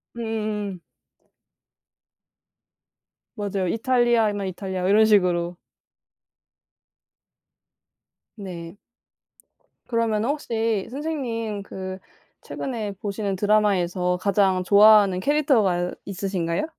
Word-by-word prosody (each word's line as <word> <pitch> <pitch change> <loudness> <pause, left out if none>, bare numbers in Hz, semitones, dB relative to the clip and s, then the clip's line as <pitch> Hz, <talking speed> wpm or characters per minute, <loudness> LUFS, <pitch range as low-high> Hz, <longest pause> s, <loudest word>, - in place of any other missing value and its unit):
음음음. 215 -4 -3 2.6
맞아요. 200 -3 -2
이탈리아이면 225 -2 +1
이탈리아 185 0 -4
이런 210 +3 +5
식으로. 180 -4 +2 2.8
네. 175 -4 -8 1.1
그러면은 230 -1 0
혹시 225 -8 -1
선생님 240 -7 -4
그 190 -1 -7 0.4
최근에 220 -6 -5
보시는 200 -1 -3
드라마에서 185 -3 +1
가장 195 -2 +2
좋아하는 205 -1 +6
캐릭터가 220 - +2
있으신가요? 190 - -2
205 Hz, 205 characters per minute, -23 LUFS, 185-225 Hz, 2.8 s, 좋아하는